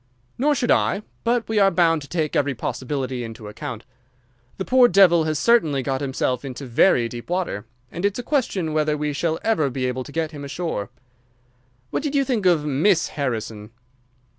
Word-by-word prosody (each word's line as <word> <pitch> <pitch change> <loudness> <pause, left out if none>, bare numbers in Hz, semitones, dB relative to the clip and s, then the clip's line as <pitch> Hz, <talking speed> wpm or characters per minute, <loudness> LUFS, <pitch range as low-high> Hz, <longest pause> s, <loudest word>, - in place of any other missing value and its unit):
"Nor 295 +3 +3
should 245 -2 0
I, 205 - +2 0.2
but 235 0 +1
we 220 -1 +1
are 195 -1 +6
bound 165 -4 +2
to 140 - -10
take 155 -2 -2
every 140 -1 +1
possibility 130 0 -3
into 115 -2 -8
account. 120 +1 -7 0.7
The 190 - -3
poor 255 -1 +6
devil 175 -5 +5
has 155 -1 0
certainly 155 - +3
got 135 0 -2
himself 130 -2 -1
into 135 0 -6
very 120 0 +3
deep 120 +3 -9
water, 175 - -2 0.2
and 175 - -6
it's 200 0 +1
a 245 - -4
question 220 - -1
whether 150 -1 +1
we 150 0 -2
shall 160 +3 -1
ever 160 -11 +2
be 130 0 -3
able 125 0 -2
to 145 - -11
get 160 0 -2
him 145 -2 -8
ashore. 140 - -4 1.0
What - - -1
did 295 -1 -3
you 275 -1 +3
think 225 -7 0
of 165 -4 +3
Miss 160 +6 +2
Harrison?" 110 -6 -4
155 Hz, 190 wpm, -22 LUFS, 130-195 Hz, 1.0 s, are